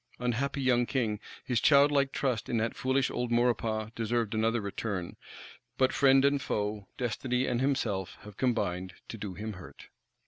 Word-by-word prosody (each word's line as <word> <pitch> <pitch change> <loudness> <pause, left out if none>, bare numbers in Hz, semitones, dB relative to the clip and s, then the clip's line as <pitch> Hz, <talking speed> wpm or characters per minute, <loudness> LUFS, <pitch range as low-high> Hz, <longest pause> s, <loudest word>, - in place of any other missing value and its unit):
Unhappy 135 +3 -1
young 120 -2 +3
King, 110 -6 -1 0.3
his 120 -3 0
childlike 140 -1 +5
trust 125 -6 -1
in 120 - 0
that 115 +1 -1
foolish 130 +1 +1
old 120 -1 -2
Maurepas 115 -2 +1
deserved 115 -1 -1
another 115 +2 +1
return. 100 -3 -4 0.6
But 130 -1 +3
friend 135 0 +5
and 140 0 +2
foe, 105 -4 -2
destiny 125 +1 -1
and 120 -1 0
himself 115 -9 -1
have 105 -1 -12
combined 95 -8 -1
to 115 - -7
do 100 -3 -5
him 110 +1 -5
hurt. 90 -1 -12
120 Hz, 160 wpm, -30 LUFS, 105-130 Hz, 0.6 s, childlike